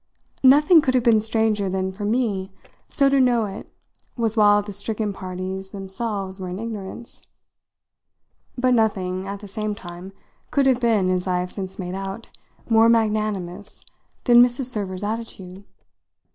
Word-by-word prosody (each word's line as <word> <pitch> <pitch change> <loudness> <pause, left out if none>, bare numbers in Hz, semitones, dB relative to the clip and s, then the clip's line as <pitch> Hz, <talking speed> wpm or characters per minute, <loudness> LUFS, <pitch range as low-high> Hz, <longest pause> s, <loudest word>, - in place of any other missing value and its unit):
Nothing 295 +5 +7
could 260 -2 0
have 250 - +3
been 225 -2 +4
stranger 220 -2 0
than 190 0 -2
for 205 +2 -6
me 205 -4 -1 0.4
so 275 - +3
to 275 0 +3
know 245 -3 +3
it 200 0 -8 0.5
was 225 -2 0
while 205 -1 +5
the 205 0 -8
stricken 210 +1 -3
parties 190 0 -6
themselves 195 0 -4
were 185 -1 -5
in 180 - -5
ignorance; 220 +1 -7 1.4
but 255 0 +2
nothing, 190 -5 0
at 200 +1 -6
the 205 - -9
same 215 +1 -3
time, 175 -1 -10 0.4
could 280 -1 +2
have 260 -2 +3
been, 215 -6 +2
as 185 0 -1
I 180 -1 +1
have 180 0 -5
since 190 -1 -6
made 180 -2 -5
out, 195 +3 -6 0.4
more 225 0 +5
magnanimous 210 -4 -1 0.4
than 240 -1 +7
Mrs. 245 +2 +3
Server's 200 -6 -3
attitude. 205 -3 -6
205 Hz, 155 wpm, -23 LUFS, 190-230 Hz, 1.4 s, Nothing